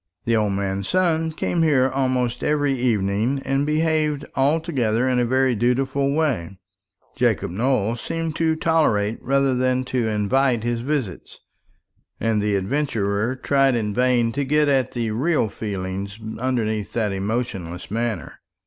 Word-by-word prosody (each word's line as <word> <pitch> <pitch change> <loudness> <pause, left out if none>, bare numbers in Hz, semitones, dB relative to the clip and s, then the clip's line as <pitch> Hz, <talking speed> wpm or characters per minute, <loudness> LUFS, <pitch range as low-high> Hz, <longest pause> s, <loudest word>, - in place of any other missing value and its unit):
The 115 - +2
old 105 -2 +1
man's 95 0 -2
son 165 -3 +1
came 165 +2 -1
here 140 -5 +4
almost 130 -2 -1
every 145 -2 +1
evening, 115 0 0
and 135 +2 0
behaved 155 -1 +1
altogether 135 -5 +1
in 125 -1 +2
a 120 - +2
very 130 +1 +2
dutiful 130 +4 +1
way. 120 - -1 0.6
Jacob - - +1
Nowell 115 +1 0
seemed 165 +5 -4
to 160 -1 +2
tolerate 135 -11 +1
rather 135 0 +2
than 130 0 +1
to 125 -3 -1
invite 115 +3 +1
his 120 0 -1
visits, 130 - -3 0.8
and 110 -1 +1
the 105 0 +1
adventurer 105 0 -1
tried 135 0 +2
in 105 -3 -1
vain 125 -1 +2
to 140 +4 -1
get 150 +2 +2
at 135 -2 +1
the 115 -3 -2
real 130 +1 +1
feelings 100 -1 -5 0.2
underlying 115 -4 0
that 110 -4 0
emotionless 95 -4 -3
manner. 115 -5 -3
125 Hz, 140 wpm, -22 LUFS, 105-140 Hz, 0.8 s, here